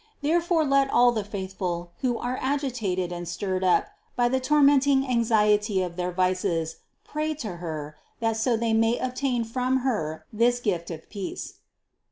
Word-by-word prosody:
There 330 +4 +3
fore 335 -2 +1
let 275 -1 +3
all 245 -1 +5
the 220 -3 -2
faithful, 190 -3 -4
who 245 -3 0
are 250 +1 -3
agitated 240 -10 -1
and 175 0 -5
stirred 185 +2 -2
up 180 -1 +3 0.3
by 240 0 +2
the 260 +1 +1
tormenting 280 -1 +4
anxiety 210 -4 +2
of 175 -1 -5
their 180 0 -2
vices, 180 -3 0 0.3
pray 305 +1 -2
to 215 - -6
Her, 155 -3 -6 0.2
that 225 -1 0
so 225 +1 +1
they 230 0 0
may 225 +2 +3
obtain 255 -1 -1
from 255 +3 0
Her 160 -10 -2
this 240 +3 +3
gift 180 -8 -2
of 160 -2 -8
peace. 200 -3 -6
225 Hz, 165 wpm, -26 LUFS, 185-255 Hz, 0.3 s, all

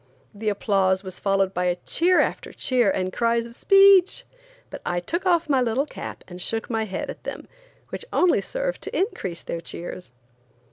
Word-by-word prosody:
The 215 +1 -2
applause 195 -2 +1
was 185 -1 -7
followed 195 -1 +1
by 180 0 +1
cheer 355 +2 +3
after - - -2
cheer 245 -5 +1
and 185 -1 -1
cries 230 0 +1
of 235 - -11
"Speech!" 390 +4 +5 0.5
but - - -7
I 175 - -1
took 340 - -3
off 340 -2 +3
my 275 -3 +3
little 245 +3 +1
cap - - -8
and 180 -1 -8
shook 225 +5 -2
my 225 -1 0
head 190 -3 -4
at - - -13
them, - - -7 0.4
which - - -6
only 360 - +3
served - - -3
to - - -4
increase 195 - -2
their 170 - -4
cheers. 175 -4 -7
225 Hz, 180 wpm, -24 LUFS, -, 0.5 s, Speech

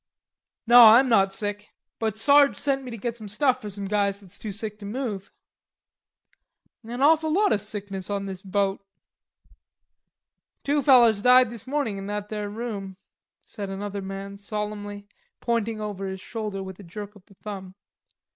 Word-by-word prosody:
"Naw, 235 -2 +9
I'm 260 +3 +5
not 195 -4 +4
sick; 205 +1 -4 0.3
but 220 -2 -1
Sarge 280 +4 +5
sent 275 -1 0
me 255 - -7
to 230 - -6
get 235 +2 -3
some 220 -3 -9
stuff 255 +5 +1
for 210 - -6
some 200 0 -6
guys 200 0 0
that's 200 -1 -15
too 215 - -5
sick 215 +1 -4
to 205 - -9
move." 210 -4 -4 1.5
"An 240 +4 -4
awful 315 +1 +4
lot 405 +5 +3
o' - - +3
sickness 200 -2 -6
on 200 -1 -2
this 190 -2 -7
boat." 200 0 -1 1.8
"Two 290 +1 +1
fellers 240 -6 +5
died 250 0 +6
this 235 0 -8
mornin' 260 -8 -1
in 195 - -7
that 205 0 -4
there 210 -1 -4
room," 205 -4 -6 0.5
said 200 -3 -7
another 200 +1 -5
man 195 +1 -7
solemnly, 205 0 -5 0.3
pointing 230 -2 -1
over 205 -2 -4
his 190 0 -5
shoulder 210 -2 -5
with 190 0 -9
a - - -10
jerk 205 +4 -8
of 200 - -17
the 200 - -20
thumb. 190 -2 -8
210 Hz, 165 wpm, -25 LUFS, 200-235 Hz, 1.8 s, Naw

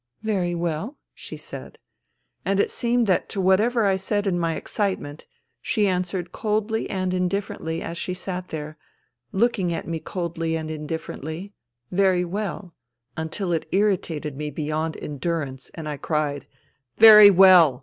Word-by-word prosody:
" - - -49
Very 175 -3 0
well," 170 - -3 0.2
she - - -9
said. - - -9 0.7
And 195 0 0
it - - +2
seemed 240 0 +1
that 185 -4 +1
to 200 - -4
whatever 210 +5 +3
I 195 -1 +3
said 205 +2 -1
in 180 -3 0
my 165 -1 0
excitement, 185 -8 -3 0.3
she 215 -5 +1
answered 180 -1 -2
coldly 220 0 -1
and 185 -1 -1
indifferently 180 -3 -2
as 170 +1 -5
she 180 - -3
sat 180 0 -5
there, 155 0 -7 0.5
looking 200 -4 +1
at 165 - -4
me 165 -1 -3
coldly 165 -2 -3
and 160 -1 -4
indifferently, 160 +4 -6 0.2
" 120 0 -50
Very 180 -2 +3
well," 195 -1 -5 0.4
until 165 +3 -3
it 160 - -2
irritated 180 -7 0
me 150 +1 -4
beyond 155 +2 -3
en 145 -2 -7
durance, 140 -4 -3
and 160 -2 -6
I 150 -1 -4
cried: 145 -2 -2 0.5
^^Very 215 -2 +11
well! 180 -8 +7
175 Hz, 155 wpm, -24 LUFS, 160-200 Hz, 0.7 s, ^^Very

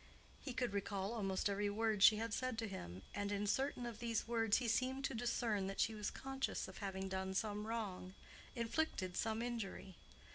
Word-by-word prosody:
He 270 - -5
could 245 -3 -1
recall 200 +1 -1
almost 195 -4 0
every 205 +1 +1
word 215 0 +1
she 215 - +10
had 225 0 -2
said 255 -2 -1
to 225 -1 -1
him, 95 - -6
and 205 0 -1
in 205 0 0
certain 255 +3 +1
of 235 -2 -5
these 230 -2 0
words 225 -2 +3
he 245 - -1
seemed 260 +4 +1
to - - -1
discern 230 -4 +1
that 195 - -4
she 225 - +3
was 210 -2 -2
conscious 270 0 -2
of 190 - -9
having 190 -1 -2
done 190 0 -2
some 210 +1 0
wrong—inflicted 220 - -3
some 225 +1 0
injury. 210 -5 -4
215 Hz, 185 wpm, -40 LUFS, 195-235 Hz, -, she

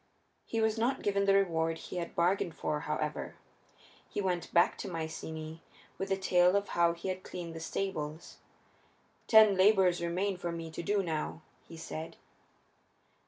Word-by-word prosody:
He 225 - -1
was 220 0 +1
not 245 +4 0
given 200 -1 +1
the 195 0 +5
reward 165 -4 +1
he 180 - -7
had 170 -1 -4
bargained 175 -1 +1
for, 150 -1 -2
however. 150 -1 -3 0.7
He - - -4
went 180 -3 -1
back 170 - +4
to - - -4
Mycenæ 160 -1 -5 0.4
with 195 - -3
the 195 - +1
tale 180 -1 +4
of 200 0 0
how 170 -1 +3
he 170 +3 -5
had 185 0 -3
cleaned 175 -3 -7
the 165 - -6
stables. 160 -3 -4 0.9
"Ten 220 -2 +8
labors 185 -2 +4
remain 180 +3 -1
for 175 -1 -3
me 165 -1 -6
to 160 - -5
do 200 +3 +1
now," 160 -1 -3 0.2
he 165 - -10
said. 160 0 -7
175 Hz, 165 wpm, -31 LUFS, 165-195 Hz, 0.9 s, Ten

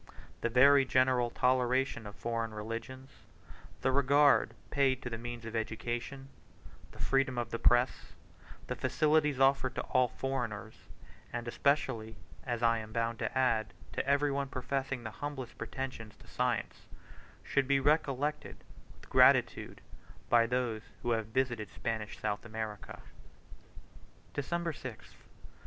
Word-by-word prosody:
The 120 - +1
very 135 +3 +6
general 130 -2 +2
toleration 125 -1 +1
of 105 - -10
foreign 115 -1 -3
religions, 115 +5 -6 0.7
the 130 - +2
regard 140 +1 +4 0.2
paid 135 -2 +2
to 120 - -5
the 115 - -3
means 120 0 -6
of 115 0 -6
education, 120 +4 -3 0.6
the - - -15
freedom 135 -2 +1
of 120 - -2
the 115 - -3
press, 120 +1 +2 0.5
the - - -4
facilities 150 -3 +2
offered 135 -1 +3
to - - -2
all 130 -1 +2
foreigners, 120 -5 -4 0.6
and 120 0 -4
especially, 115 -4 0 0.3
as 120 -2 -2
I 115 0 +4
am 110 0 -8
bound 115 0 -1
to 120 +2 -2
add, 115 -4 +1 0.2
to - - -1
every 140 +1 +3
one 140 0 -1
professing 135 -1 -3
the 110 - -5
humblest 135 -2 -6
pretensions 130 -6 -5
to - - -19
science, - - -2 0.6
should 140 -2 +1
be 140 0 +3
recollected 150 0 0 0.4
with - - -16
gratitude - - +4 0.5
by 115 -1 +5
those 120 -3 -1 0.2
who 120 - 0
have 110 -2 0
visited 120 -3 -1
Spanish 110 -2 -4
South 105 - -2
America. 110 -2 -6 1.3
December 170 +3 -2
6th. 130 -5 -9
125 Hz, 135 wpm, -32 LUFS, 115-135 Hz, 1.3 s, very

